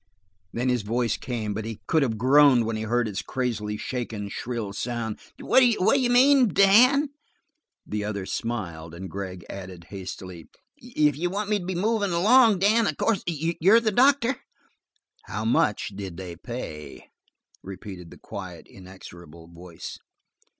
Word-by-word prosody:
Then 120 +2 -2
his 125 -2 +1
voice 115 +2 -1
came, 115 -5 -4
but 110 +2 -4
he 110 -1 -6
could 160 - +2
have 115 -5 0
groaned 130 0 +5
when 115 0 -2
he 110 - -4
heard 120 +2 0
its 100 -2 -4
crazily 110 -5 -3
shaken, 115 -4 -5
shrill 115 -3 -5
sound. 115 -1 -4 0.2
"What 260 - +3
d'you 245 +1 +3
mean, 260 +1 +5
Dan?" 240 - +5 0.8
The 105 0 -3
other 100 -2 -4
smiled 85 -9 -5
and 95 0 -8
Gregg 95 -2 -6
added 95 -3 -9
hastily: 95 -3 -8 0.3
"If 155 - 0
you 175 +1 0
want 205 +3 -3
me 210 - +2
to 175 - -8
be 185 0 -3
movin' 205 0 0
along, 220 +4 +5
Dan, 210 +4 +3
of - - -2
course 220 -5 +1
you're 170 +6 +3
the 225 -2 0
doctor." 265 +2 +3 0.9
"How 110 +1 -4
much 105 -2 +1
did 95 -4 -8
they 90 -2 -7
pay?" 80 - -8 0.5
repeated 95 -2 -9
the - - -13
quiet, - - -9
inexorable 85 -3 -13
voice. 85 0 -10
120 Hz, 150 wpm, -25 LUFS, -, 0.9 s, groaned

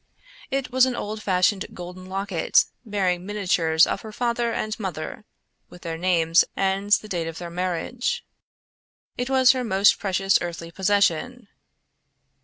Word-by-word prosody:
It 270 -2 -2
was 260 0 +4
an 255 - -2
old 215 -1 -5
fashioned 190 0 +1
golden 180 +1 -9
locket 195 -3 +1 0.2
bearing 190 -5 -1
miniatures 180 -5 +2
of - - -3
her 220 - -9
father 235 +1 -1
and 215 -1 -2
mother 190 +1 -5 0.4
with 180 - -14
their 165 -1 -4
names 165 -1 +3
and 195 +1 -1
the 215 +1 +3
date 175 -5 -3
of 165 0 -6
their 175 -1 -7
marriage. 185 - -2 0.9
It 245 +1 -3
was 260 -1 +6
her 260 -1 -2
most 200 -2 +3
precious 195 -1 +2
earthly 170 -1 -6
possession. 200 +5 0
195 Hz, 145 wpm, -24 LUFS, 175-220 Hz, 0.9 s, was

